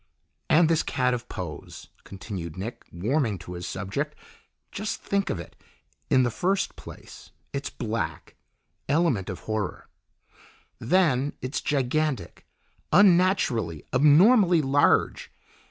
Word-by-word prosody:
"And 160 +1 +5
this 165 -1 +2
cat 125 -2 0
of 120 -1 -5
Poe's," 85 -5 -8 0.2
continued 95 -4 -7
Nick, 110 +6 -6
warming 110 - 0
to 90 - -9
his 90 0 -6
subject. 105 +11 -4 0.6
"Just 210 +1 -4
think 200 0 0
of 85 - -2
it 85 - -10 0.5
in 130 - +4
the 120 - 0
first 190 - -1
place, - - -12 0.2
it's 140 0 -3
black; 115 -2 -4 0.5
element 145 - +1
of 95 - -6
horror. 110 -3 -4 0.9
Then, 145 -2 +2
it's 130 +3 -3
gigantic, 140 - -1 0.4
unnaturally, 175 - +3
abnormally 170 - +5
large. 140 +1 +2
130 Hz, 115 wpm, -26 LUFS, 105-165 Hz, 0.9 s, And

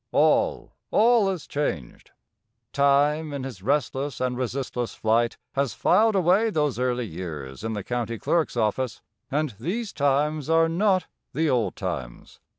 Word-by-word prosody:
All, - - +2 0.2
all 225 -2 +4
is 185 -5 -4
changed. 85 - -4 0.6
Time 145 +2 +3
in 140 -2 -4
his 125 -8 -7
restless 140 +2 -1
and 125 -1 -1
resistless 125 -1 -3
flight 115 +2 +1 0.2
has 135 -6 -1
filed 220 0 +3
away 190 +5 +3
those 150 - 0
early 125 -1 0
years 80 -6 -7
in 110 0 -2
the 105 -2 -4
county 120 0 -3
clerk's 160 +1 0
office, 115 +2 -1 0.3
and 150 -2 -1
these 200 - -3
times 145 +1 +1
are 165 0 +4
not 185 +1 +2 0.3
the 155 +2 +1
old 115 -7 0
times. - - -6
140 Hz, 145 wpm, -25 LUFS, 115-160 Hz, 0.6 s, all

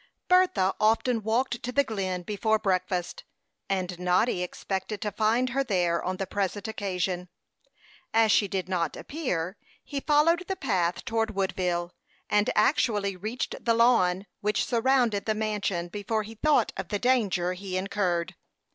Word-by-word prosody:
Bertha 360 - +4
often 225 +2 +2
walked 235 +3 0
to 250 - -4
the 280 +2 +3
Glen 190 -7 -3
before 215 +3 +1
breakfast, 185 - -1 0.5
and 185 -2 -2
Noddy 180 +3 +2
expected 190 +3 -4
to 210 - -2
find 225 +5 +1
her 275 +2 +1
there 175 -7 0
on 185 +1 -2
the 195 - -2
present 200 +2 -2
occasion. 180 -4 -2 0.8
As 225 -1 +4
she 205 - +4
did 190 -2 -3
not 175 -4 -1
appear, 195 - -3 0.3
he 285 - -4
followed 320 +5 +3
the 385 - -1
path 185 - -1
toward 225 -2 -1
Woodville, 180 -2 -1 0.4
and 210 0 +3
actually 210 -4 +2
reached 215 +7 -4
the 230 -1 +3
lawn 205 -6 +3
which 210 0 0
surrounded 240 -3 +2
the 215 - +1
mansion 205 -5 -1
before 210 +3 -2
he 220 +2 -9
thought 300 +7 +2
of - - -4
the 205 - -1
danger 200 -7 +1
he 185 0 -4
incurred. 185 -3 -1
205 Hz, 150 wpm, -27 LUFS, 185-230 Hz, 0.8 s, Bertha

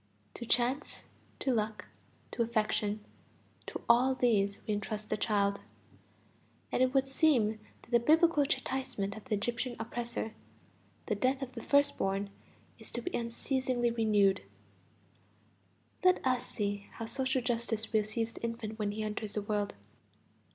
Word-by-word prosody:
To 235 - -7
chance, 250 +5 +1 0.3
to 265 - 0
luck, 215 -1 -1 0.5
to - - -2
affection, 215 -2 0 0.6
to - - -5
all 250 +3 +5
these 205 -6 +2
we 215 - 0
entrust 210 +1 -4
the - - +3
child; 200 -2 +1 1.1
and - - +1
it 255 0 +4
would 270 0 +3
seem 255 -7 +3 0.2
that - - -19
the 235 - +6
Biblical 315 +4 +4
chastisement 260 -7 -2
of 220 - -10
the 230 -5 0
Egyptian 240 +4 -2
oppressor, 230 -1 -3 0.7
the 215 - 0
death 260 +6 +1
of 255 - -6
the 235 - -6
first 285 +3 +3
born, 195 +1 -1 0.5
is - - -9
to - - -2
be 360 - -3
unceasingly 240 +1 0
renewed. 210 -4 +3 1.6
Let 365 -5 +4
us 255 -1 +1
see 205 -1 -3
how 230 - -5
social 260 +2 +4
justice 230 -2 -1
receives 220 +1 0
the - - -11
infant 230 -1 -4
when 205 -1 -1
he 215 +1 -3
enters 215 0 -3
the 210 - -2
world. 205 -1 -1
230 Hz, 145 wpm, -32 LUFS, 210-255 Hz, 1.6 s, the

